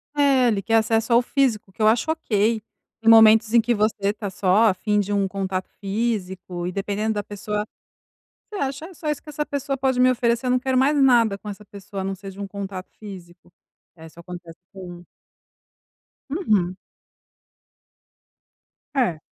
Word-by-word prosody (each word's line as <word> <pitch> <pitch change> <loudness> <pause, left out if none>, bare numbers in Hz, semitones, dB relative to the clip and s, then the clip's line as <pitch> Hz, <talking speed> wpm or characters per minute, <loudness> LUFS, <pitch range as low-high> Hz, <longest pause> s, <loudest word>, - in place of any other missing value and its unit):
É, 275 -3 +4
ele 210 -4 +1
quer 225 +4 0
acesso 225 +1 +2
ao 235 - +6
físico, 240 -7 0
que 215 - -10
eu 215 - +5
acho 235 +8 +2
ok, 225 -8 0 0.4
tem 225 - +3
momentos 220 0 +7
em 235 - +6
que 240 +2 +1
você 215 +1 +1
está 205 -1 -4
só 190 +3 +2
afim 210 +2 0
de 205 0 -2
um 200 -1 +1
contato 190 -1 -4
físico 190 -4 -3
e - - -3
dependendo 205 +3 -2
da 205 - -2
pessoa, 210 +1 -4 0.9
você - - -5
acha 275 -1 -3
é 370 - -13
só 310 -1 -6
isso 300 - -2
que 310 - -18
essa 300 +1 -3
pessoa 280 -1 -3
pode 260 -1 0
me 255 0 +5
oferecer, 235 0 0
não 255 - +3
quero 260 +1 -1
mais 285 +3 +3
nada 235 -6 +4
com 210 - -10
essa 205 +1 -8
pessoa 200 -1 -8
a - - -5
não 195 0 -2
ser 195 +1 -9
de 195 - -12
um 200 - -4
contato 195 -2 -7
físico. 175 -4 -12 0.4
É, 160 -1 -12
isso 160 - -17
acontece 175 -1 -10 0.2
com 175 -2 -10 1.3
Uhum. 210 - 0 2.2
É. 230 - +1
210 Hz, 175 wpm, -23 LUFS, 195-245 Hz, 2.2 s, momentos